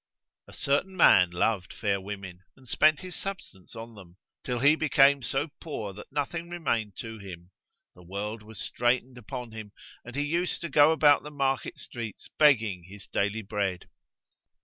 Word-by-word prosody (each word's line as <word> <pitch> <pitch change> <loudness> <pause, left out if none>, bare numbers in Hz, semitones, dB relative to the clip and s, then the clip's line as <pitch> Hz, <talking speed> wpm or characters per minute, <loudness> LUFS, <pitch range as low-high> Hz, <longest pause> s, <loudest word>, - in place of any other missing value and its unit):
A - - -14
certain 180 +7 0
man 90 - +7
loved 90 +2 0
fair 100 -3 -1
women, 95 -2 -7 0.2
and 130 -1 -18
spent 155 +4 +4
his 185 -1 -6
substance 190 - -7
on 115 +1 -8
them, 95 -4 -14 0.3
till 125 - -2
he 140 +5 +5
became 140 -3 +4
so 135 +5 -1
poor 110 -11 -5
that 105 +2 -12
nothing 165 +4 -3
remained 115 - -2
to 110 -1 -8
him; 90 -2 -10 0.4
the 90 - -17
world 100 +5 -5
was 110 0 -11
straitened 125 +1 0
upon 120 +2 -7
him 110 -2 -9 0.3
and 125 +1 -10
he 145 - 0
used 170 +4 -1
to 170 - -4
go 145 +2 +6
about 150 -2 +5
the 150 - -8
market 135 -2 -1
streets 115 -4 -7
begging 115 - +4
his 100 +2 -11
daily 105 +2 -1
bread. 100 -3 -3
115 Hz, 170 wpm, -28 LUFS, 100-145 Hz, 0.4 s, man